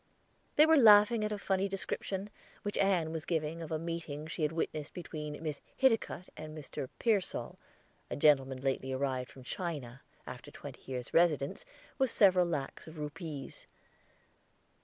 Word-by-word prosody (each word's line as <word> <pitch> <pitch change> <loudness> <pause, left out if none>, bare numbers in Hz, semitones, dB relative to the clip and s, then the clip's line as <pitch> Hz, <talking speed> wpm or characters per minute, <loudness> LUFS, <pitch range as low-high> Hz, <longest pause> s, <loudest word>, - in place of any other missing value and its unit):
They 300 - +8
were 320 0 +6
laughing 215 -2 +7
at 210 - -1
a 210 - -1
funny 195 -1 0
description, 195 +1 -3 0.3
which 205 - -2
Ann 180 -5 +2
was 160 -1 -3
giving 160 0 -2
of 165 - -7
a 160 - +1
meeting 160 -2 -4
she 160 +1 -6
had 150 0 +2
witnessed 155 -2 -3
between 150 -4 -5
Miss 150 -3 -3 0.2
Hiticutt 225 -7 +2
and 155 0 -8
Mr. 135 -3 -6
Pearsall, 210 -6 0 0.5
a - - -3
gentleman 135 -3 +4
lately 135 -1 -1
arrived 130 -1 -1
from 130 - -13
China, 140 -6 -5 0.2
after - - -8
a - - -15
twenty - - -10
years' 125 0 -4
residence, 165 - +2 0.3
with 265 -1 +3
several 185 -5 +5
lacs 150 -3 -4
of 160 0 -10
rupees. 150 -1 -6
160 Hz, 160 wpm, -32 LUFS, 145-195 Hz, 0.5 s, They